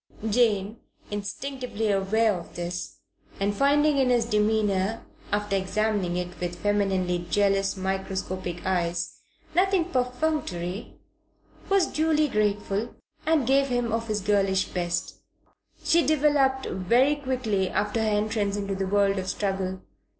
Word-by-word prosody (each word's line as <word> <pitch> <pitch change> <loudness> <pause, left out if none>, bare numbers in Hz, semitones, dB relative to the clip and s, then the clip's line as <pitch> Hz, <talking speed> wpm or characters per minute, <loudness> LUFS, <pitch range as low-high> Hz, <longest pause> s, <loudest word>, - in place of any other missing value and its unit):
Jane, 215 -2 +2 0.3
instinctively 220 +2 -3
aware 210 +3 +2
of 170 -2 -8
this, 175 +1 -5 0.4
and 200 +1 0
finding 290 +3 +3
in 260 -1 +3
his 240 -2 +3
demeanour, 210 -1 +1 0.3
after 205 -1 0
examining 195 -2 0
it 180 0 -5
with 175 0 -3
femininely 190 -3 0
jealous, 195 -1 +2
microscopic 190 -2 -3
eyes, 175 -2 -1 0.3
nothing 370 0 +3
perfunctory, 250 - -2 0.7
was 390 -2 +4
duly 310 -1 +1
grateful, 210 -1 -1 0.3
and 315 -5 +3
gave 275 +2 +3
him 245 -3 -1
of 225 +1 -1
her 215 - -1
girlish 195 -2 +2
best. 175 0 -2 0.7
She 335 0 +4
developed 280 -3 +2
very 240 +10 +2
quickly 255 -9 -1
after 210 +2 0
her 220 - +1
entrance 210 -1 0
into 200 -1 -2
the 195 0 -2
world 200 0 +2
of 185 0 -4
struggle. 190 -2 -2
205 Hz, 125 wpm, -26 LUFS, 190-250 Hz, 0.7 s, was